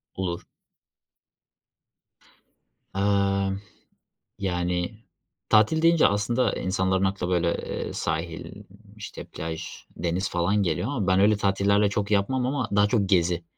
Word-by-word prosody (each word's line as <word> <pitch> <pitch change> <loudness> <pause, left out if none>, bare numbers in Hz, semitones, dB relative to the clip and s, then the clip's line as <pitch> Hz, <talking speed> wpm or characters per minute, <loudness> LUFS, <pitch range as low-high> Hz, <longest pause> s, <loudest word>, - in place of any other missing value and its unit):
Olur. 90 -2 -3 2.5
Imm, 100 0 +1 0.8
yani 90 0 -1 0.5
tatil 110 +9 +4
deyince 165 -1 +5
aslında 110 +3 +1
insanların 95 0 0
aklına 95 -2 -1
böyle, 85 -1 +1 0.3
ııı, - - -6
sahil, 85 +5 -4 0.3
işte, 105 - -8
plaj, 80 +1 -6 0.3
deniz 90 +3 -1
falan 95 +4 +1
geliyor 85 +4 -1
ama 120 -9 -2
ben 95 0 +4
öyle 105 +1 +4
tatillerle 100 +1 +2
çok 105 +1 -2
yapmam 125 +6 +1
ama 130 -2 -1
daha 105 0 +5
çok 100 -3 +1
gezi. 85 -2 +2
100 Hz, 115 wpm, -25 LUFS, 90-105 Hz, 2.5 s, deyince